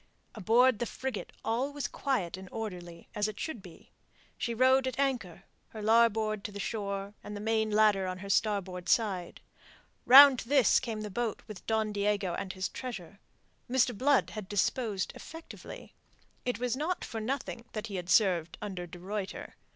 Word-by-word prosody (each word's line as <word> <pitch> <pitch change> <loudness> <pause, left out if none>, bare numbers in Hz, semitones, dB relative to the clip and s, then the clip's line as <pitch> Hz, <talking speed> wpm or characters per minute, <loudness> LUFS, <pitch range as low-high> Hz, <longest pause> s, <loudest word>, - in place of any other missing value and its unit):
Aboard 230 +3 +3
the 240 - -1
frigate 260 -5 -5
all 245 +5 0
was 285 -3 -3
quiet 205 -12 -2
and 190 0 -10
orderly 175 -6 -7
as 210 -1 0
it 215 - -7
should 290 -10 -4
be. 175 -4 -15 0.4
She 235 -1 -3
rode 260 +2 +4
at 260 - -3
anchor, 240 -10 -1 0.2
her 215 - -9
larboard 220 -2 +3
to - - -4
the 200 - -8
shore, 200 -2 -3
and 210 0 -6
the - - -6
main 220 0 0
ladder 210 -3 +3
on 185 0 -4
her 200 +2 -8
starboard 190 -4 0
side. 195 -6 0 0.7
Round 270 0 +10
to 235 - -8
this 275 -5 +5
came 220 -3 -4
the 210 -1 -6
boat 230 +1 -2
with 210 -5 -10
Don 220 -1 +1
Diego 205 -3 0
and 190 +2 -4
his 185 0 -2
treasure. 200 -7 -7 0.5
Mr. 250 -1 +2
Blood 275 +5 +2
had 210 -3 -7
disposed 205 0 0
effectively. 325 +1 -10 0.5
It 245 - -1
was 245 0 -1
not 320 +6 -2
for 225 - -5
nothing 240 0 -4
that 215 0 -4
he 200 -4 -5
had 180 0 -6
served 175 -4 +3
under 185 -4 -5
de 175 - -10
Ruyter. 195 +2 -5
215 Hz, 175 wpm, -30 LUFS, 195-245 Hz, 0.7 s, Round